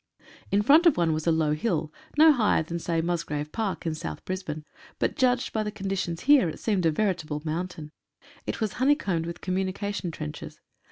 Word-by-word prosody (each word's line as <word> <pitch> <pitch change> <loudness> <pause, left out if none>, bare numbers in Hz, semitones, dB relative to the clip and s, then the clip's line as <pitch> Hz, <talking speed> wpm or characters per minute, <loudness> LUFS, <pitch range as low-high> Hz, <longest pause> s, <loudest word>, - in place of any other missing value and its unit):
In 205 +1 +3
front 310 +9 +6
of 325 - +4
one 165 -2 +2
was 155 +1 -3
a - - +5
low 160 -2 +2
hill, 155 -3 -1 0.2
no 315 +1 +8
higher 220 - +2
than, 170 +2 -4
say, 165 -1 -1
Mus 170 0 0
grave 150 0 -4
Park 215 -6 -3
in 165 - 0
South 80 - -6
Brisbane, 160 -5 -4 0.3
but - - 0
judged 255 -3 +1
by 220 - 0
the 210 0 -2
condi 195 -2 -3
tions 175 -3 -3
here, 275 - +5
it - - -8
seemed 195 -6 +1
a - - +3
veritable 160 -5 -1
mountain. 160 -1 -4 0.6
It - - -3
was 220 -4 -1
honeycombed 205 - +2
with 170 - -7
communication 190 +1 -2
trenches. 75 - -7
180 Hz, 200 wpm, -27 LUFS, 160-215 Hz, 0.6 s, no